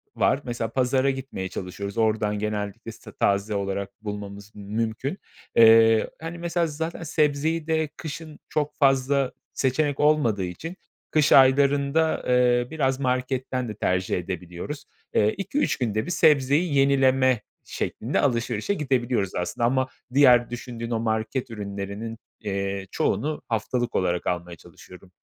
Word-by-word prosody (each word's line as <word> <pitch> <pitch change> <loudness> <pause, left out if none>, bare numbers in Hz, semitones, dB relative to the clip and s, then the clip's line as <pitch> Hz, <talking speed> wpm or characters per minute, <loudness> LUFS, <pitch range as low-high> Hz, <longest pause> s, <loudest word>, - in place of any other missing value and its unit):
var. 135 - +2
Mesela 120 -2 -3
pazara 130 +1 +2
gitmeye 130 -8 -4
çalışıyoruz. 100 +4 -6
Oradan 110 -2 +1
genellikle 105 -1 -4
işte - - -13
taze 100 +1 +1
olarak 100 +2 -4
bulmamız 100 0 -7
mümkün. 110 - -3 0.4
Eee, 115 -1 +6
hani, 165 +1 -6
mesela, 170 0 0
zaten 160 +3 -4
sebzeyi 155 +1 0
de 160 -1 +1
kışın 155 0 -7
çok 150 -1 -1
fazla 135 -1 +2 0.2
seçenek 140 +2 0
olmadığı 145 -10 +3
için 160 - -7 0.4
kış 150 -2 +3
aylarında, 140 +3 +4
eee, 125 -1 +3
biraz 135 -4 0
marketten 130 -1 -1
de 105 - -6
tercih 95 -3 0
edebiliyoruz. 90 - -6 0.3
Eee, 105 0 +3
2-3 280 +9 0
günde 110 -4 -1
bir - - -4
sebzeyi 150 0 +3
yenileme 135 -3 +3 0.3
şeklinde 120 +6 -2
alışverişe 125 +9 0
gidebiliyoruz 125 - 0
aslında 90 +6 -1
ama 130 +1 +2 0.3
diğer 125 -4 +6
düşündüğün 120 -1 -6
o 115 - 0
market 110 +3 -2
ürünlerinin, 100 +1 -5 0.2
iii, 100 -2 -3
çoğunu 150 +10 -1
haftalık 120 +2 -1
olarak 90 -1 0
almaya 85 -1 -2
çalışıyorum. 90 +3 -15
125 Hz, 130 wpm, -25 LUFS, 105-140 Hz, 0.4 s, Eee